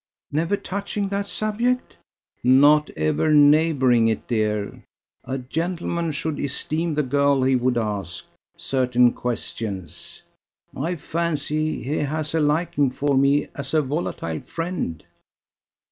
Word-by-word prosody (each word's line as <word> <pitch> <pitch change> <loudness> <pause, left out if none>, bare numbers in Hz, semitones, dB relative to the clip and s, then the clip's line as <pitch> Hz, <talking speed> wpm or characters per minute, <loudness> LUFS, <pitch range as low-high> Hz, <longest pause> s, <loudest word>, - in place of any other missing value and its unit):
"Never 165 +7 0
touching 200 +1 -3
that 200 0 -2
subject?" 235 +5 -1 0.5
"Not 145 +4 +5
ever 80 - +1
neighbouring 145 -5 +5
it, 110 -2 -1
dear. 105 -3 -1 0.4
A 130 - -3
gentleman 170 +4 -2
should 150 +1 -3
esteem 155 +3 -2
the 150 - +1
girl 140 0 +2
he 130 0 +3
would 125 0 +1
ask... 100 -6 -3 0.3
certain 125 -2 +2
questions. 100 -8 -5 0.5
I 165 +7 -2
fancy 155 -2 -2
he 145 +4 -2
has 155 +1 -2
a 165 - +2
liking 150 -2 +2
for 140 +2 0
me 140 +2 +3
as 140 +2 -4
a 155 - +4
volatile 130 - -3
friend." 165 - -4
145 Hz, 120 wpm, -23 LUFS, 125-160 Hz, 0.5 s, Not